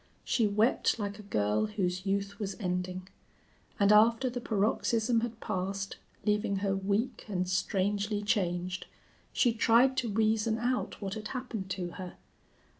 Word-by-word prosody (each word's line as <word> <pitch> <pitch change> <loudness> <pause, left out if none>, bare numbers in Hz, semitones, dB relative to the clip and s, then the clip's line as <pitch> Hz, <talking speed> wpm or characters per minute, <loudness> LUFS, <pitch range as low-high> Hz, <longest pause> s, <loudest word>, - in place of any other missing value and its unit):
She 225 -3 +2
wept 215 +5 +2
like 205 -2 -4
a - - -6
girl 105 - 0
whose 185 -3 -2
youth 200 +1 -1
was 200 -2 -4
ending; 180 -1 -3 0.7
and 200 0 +5
after 230 +4 +5
the 245 0 -4
paroxysm 225 +2 +1
had 230 -1 -4
passed, 195 +1 -3 0.3
leaving 210 -1 +1
her 195 0 0
weak 200 +5 -1
and 185 -3 -1
strangely 205 +3 0
changed, 185 -3 -1 0.4
she 240 -3 +3
tried 235 +4 +4
to 245 -3 0
reason 220 +1 +2
out 245 -2 -2
what 195 -1 -3
had 215 0 -5
happened 240 -7 -5
to 180 -2 -3
her. 180 -1 -7
205 Hz, 145 wpm, -30 LUFS, 190-225 Hz, 0.7 s, and